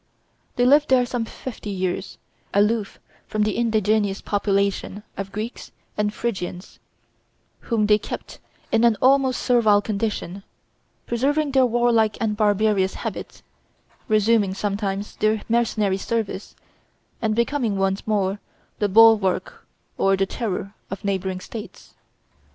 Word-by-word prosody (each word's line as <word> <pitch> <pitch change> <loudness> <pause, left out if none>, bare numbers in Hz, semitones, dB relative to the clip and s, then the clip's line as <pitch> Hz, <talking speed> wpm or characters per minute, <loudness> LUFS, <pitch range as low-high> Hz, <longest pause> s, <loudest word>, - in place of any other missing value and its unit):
They 245 - +2
lived 290 +3 +5
there 255 -1 +4
some 245 -1 -2
fifty 225 -2 -8
years, 185 -1 -3 0.4
aloof 210 0 +1 0.3
from 215 0 0
the 210 -2 0
indigenous 215 -3 +1
population 200 0 -1
of 195 0 -5
Greeks 215 +4 -6 0.2
and 210 0 0
Phrygians, 190 -5 -5 0.9
whom 225 -3 +2
they 210 0 +4
kept - - -7 0.3
in 225 +1 +3
an 230 -3 +4
almost 265 -1 +3
servile 225 -5 +4
condition, 205 -2 -3 0.6
preserving 280 +5 0
their 265 -2 +4
warlike 235 -2 +2
and 215 -2 0
barbarous 205 -2 +2
habits, - - -6 0.6
resuming 215 -2 +2
sometimes 200 0 -3
their 215 0 +1
mercenary 220 -4 +1
service, 215 -1 -3 0.7
and 215 -1 0
becoming 235 -3 0
once 195 +1 -1
more 200 -2 0 0.4
the 205 - +1
bulwark 215 -2 +4 0.3
or 195 0 +3
the 195 - +2
terror 195 -2 -4 0.2
of 195 +1 -7
neighboring 190 -1 -1
states. 220 +3 -10
215 Hz, 120 wpm, -23 LUFS, 195-230 Hz, 0.9 s, lived